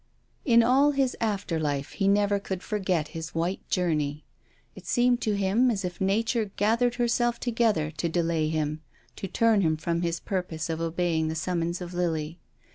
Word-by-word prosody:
In 235 -4 +6
all 275 +5 +4
his 270 -2 +1
after 200 -6 -1
life 145 -1 -2
he 195 +6 -1
never 200 0 +3
could 190 -2 -5
forget 185 -7 -1
his 165 0 -7
white 170 +4 -2
journey. 155 -5 -1 0.5
It - - -13
seemed 245 0 +2
to 215 -2 0
him 200 +6 +3
as 200 -5 -1
if 180 0 -6
nature 220 +4 +1
gathered 235 +4 +2
herself 240 0 +1
together 225 -10 +1
to 165 +2 -2
delay 165 -2 0
him, 155 -1 -2 0.4
to 195 - -4
turn 225 +1 +3
him 160 -3 +1
from 170 +1 -1
his 170 -1 -1
purpose 170 -4 -3
of 160 0 -3
obeying 165 -1 0
the 160 - -2
summons 170 +1 -2
of 180 0 -6
Lily. 165 -2 -2
180 Hz, 175 wpm, -27 LUFS, 160-220 Hz, 0.5 s, In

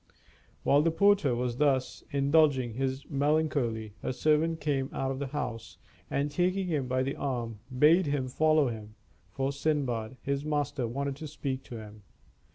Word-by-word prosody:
While 140 +1 +5
the 165 - +3
porter 180 -6 +3
was 120 0 -2
thus 135 -3 +1
indulging 140 -3 +3
his 135 +3 -2
melancholy, 140 -7 0
a - - -2
servant 155 +4 +2
came 140 -3 -1
out 135 0 -2
of 135 - -4
the 140 - -2
house, 115 -9 -5 0.3
and 145 +1 -1
taking 185 +5 +1
him 150 -7 -1
by 130 +1 +1
the 135 +1 -2
arm, 120 -5 -3 0.2
bade 160 +5 +5
him 140 -2 0
follow 155 +1 +3
him, 110 -2 -8 0.3
for 135 +7 -1
Sindbad, 135 -5 -1
his 140 0 -1
master, 145 -4 -1
wanted 140 +3 -3
to 155 +1 -6
speak 135 -3 -4
to 120 - -8
him. 105 -1 -10
140 Hz, 165 wpm, -29 LUFS, 125-150 Hz, 0.3 s, While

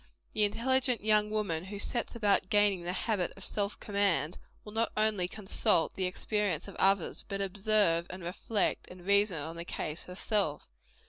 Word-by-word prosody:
The 210 - +3
intelligent 250 +2 +1
young 210 -1 +3
woman 200 -6 -1
who 200 +1 -6
sets 235 +4 -3
about 205 -4 +2
gaining 205 -3 +3
the 175 +1 -3
habit 185 0 -1
of 195 - -4
self 205 0 -2
command, 200 -5 0 0.3
will 210 - -8
not 225 +1 +1
only 215 -4 +2
consult 190 -5 +1
the 190 - -1
experience 190 -2 -1
of - - -8
others, 195 -3 +2
but 195 - -3
observe, 195 -3 +2
and 185 0 -7
reflect, 190 +4 -1
and 180 -1 -12
reason 200 -2 +3
on 160 +3 -5
the 170 - -4
case, 155 -1 -4
herself. 180 - -1
200 Hz, 170 wpm, -31 LUFS, 180-210 Hz, 0.3 s, The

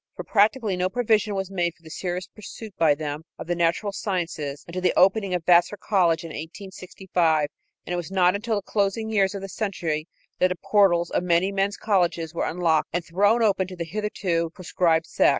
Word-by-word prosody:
For - - -6
practically 215 0 +2
no 180 +1 0
provision 215 -2 +1
was 190 0 -3
made 175 -3 -1
for 165 - -30
the 160 - -12
serious 180 +1 -3
pursuit 215 0 -10
by 155 -3 +3
them 150 0 -4 0.2
of - - -7
the 175 - -1
natural 170 +4 0
sciences 170 -8 -3
until 180 +2 -5
the 180 - +1
opening 195 0 +3
of 170 -2 -4
Vassar 175 +3 +4
College 170 -6 +1
in 165 - -7
1865, 175 -2 -2 0.4
and - - -4
it - - -1
was 175 -1 -5
not 185 -2 +3
until 220 +2 -1
the 205 - -2
closing 210 +2 -1
years 200 -2 +2
of 195 - -6
the - - -4
century 170 -6 -3 0.3
that 185 - +5
the 180 - -3
portals 175 -3 +2
of - - +1
many 180 +2 +2
men's 200 +1 0
colleges 175 -5 0
were 170 - -1
unlocked 165 -2 +1
and 175 -1 -2
thrown 205 +7 +2
open 195 -3 +2
to 185 - -8
the 170 -1 -4
hitherto 180 -3 -2
proscribed 165 -2 +1
sex. - - +3
185 Hz, 205 wpm, -24 LUFS, 170-200 Hz, 0.4 s, that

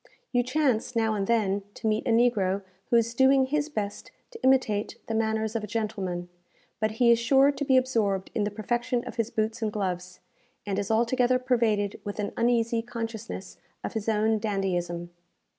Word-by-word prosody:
You 245 - +3
chance, 255 -2 0
now 225 -1 +2
and 200 -2 -1
then, 205 -4 +1
to - - -9
meet 215 0 +1
a - - +1
negro 215 -5 +2 0.3
who - - +3
is 230 0 +3
doing 265 +2 +5
his 295 +2 -1
best 205 -7 -4 0.2
to 455 -1 -11
imitate 240 -6 +2
the 225 - -4
manners 220 0 0
of 225 - -1
a - - -4
gentleman; 195 -5 -3 0.5
but 215 0 0
he 235 +1 +4
is 230 - +4
sure 270 +4 +5
to 285 - -4
be 265 -2 +4
absorbed 215 -7 0
in 215 - 0
the 205 - 0
perfection 240 +4 -1
of - - -8
his 230 -1 0
boots 220 +1 -2
and 220 -1 0
gloves, 185 -3 -3 0.5
and 200 -1 -1
is 200 - -3
altogether 245 +3 +3
pervaded 230 -5 0
with 205 - -5
an 210 -1 -2
uneasy 230 -1 +2
consciousness 225 -4 -6 0.3
of - - -4
his 220 -1 -2
own 220 0 +2
dandyism. 175 -5 -2
225 Hz, 185 wpm, -27 LUFS, 205-240 Hz, 0.5 s, doing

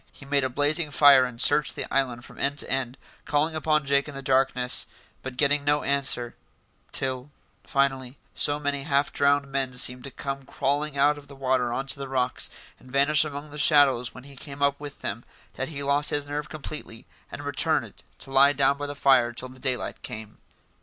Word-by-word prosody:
He 140 - -14
made 140 0 +1
a 130 - 0
blazing 145 +4 +1
fire 140 -2 +6
and 125 -2 -8
searched 145 +3 +3
the - - -3
island 125 -3 -1
from - - -14
end 140 +1 0
to - - 0
end, 130 -1 -2 0.3
calling 155 +1 +1
upon 155 -1 +1
Jake 140 +1 +1
in 145 - -9
the 135 - -7
darkness, 130 -1 +1 0.3
but 130 -1 -7
getting 145 0 +3
no 145 +1 +1
answer; 135 -4 +1 0.6
till, 130 0 -3 0.4
finally, 135 -1 -1 0.2
so 145 0 +2
many 145 -1 -2
half 140 0 0
drowned 140 0 +2
men 135 -2 -1
seemed 125 0 +2
to - - -6
come 135 +1 -5
crawling 140 +2 -2
out 145 +1 +3
of 145 - -16
the 140 - -12
water 130 -2 0
on 135 +3 -2
to 135 - -1
the 135 - -5
rocks, 125 -1 0 0.3
and 125 - -16
vanish 140 +3 +4
among 145 0 -7
the 150 - -7
shadows 140 -5 +5
when 125 - -12
he 140 0 -13
came 140 +1 -6
up 140 0 +2
with 145 -1 -9
them, 110 +4 -4 0.3
that 135 - -4
he 140 -3 -6
lost 140 +1 +1
his 145 -1 -1
nerve 145 +1 -5
completely 150 -6 -8 0.3
and - - -7
returned - - 0 0.2
to 135 - -10
lie 140 +2 +5
down 140 0 +2
by 145 - -3
the 145 - -6
fire 130 -4 +4
till 125 +2 -6
the 130 +1 -14
daylight 130 -3 -3
came. 110 -1 -8
140 Hz, 205 wpm, -26 LUFS, 130-145 Hz, 0.6 s, fire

